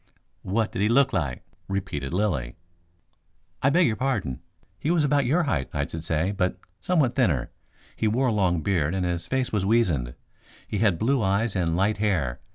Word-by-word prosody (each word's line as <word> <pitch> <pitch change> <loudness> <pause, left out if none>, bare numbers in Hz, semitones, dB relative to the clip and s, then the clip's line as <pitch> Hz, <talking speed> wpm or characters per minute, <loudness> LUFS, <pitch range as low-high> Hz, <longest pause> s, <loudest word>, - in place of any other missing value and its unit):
"What 110 +3 -1
did - - -3
he 105 - +3
look 135 +3 +4
like?" 70 -6 -2 0.2
repeated 95 -9 -3
Lilly. 85 - -1 1.1
"I 135 - +4
beg 170 +5 +4
your 115 - +1
pardon. 110 - -2 0.4
He 150 - -2
was 170 -2 +3
about 145 -2 +2
your 165 +7 +3
height, 80 - -1
I 70 0 0
should 80 +1 -7
say, 80 +3 0
but 90 -2 -1 0.2
somewhat 150 -9 +1
thinner. 85 - +1 0.4
He 110 - 0
wore 125 +4 +2
a - - 0
long 90 -5 +1
beard 90 -4 +1
and 95 -1 0
his 85 -1 -2
face 130 -1 -1
was 105 -3 +1
weazened. 90 - +1 0.5
He 105 - -2
had 100 -6 +3
blue 130 +5 +1
eyes 100 +2 +1
and 85 -3 0
light 100 +3 +1
hair. 90 - 0
100 Hz, 185 wpm, -25 LUFS, 85-120 Hz, 1.1 s, look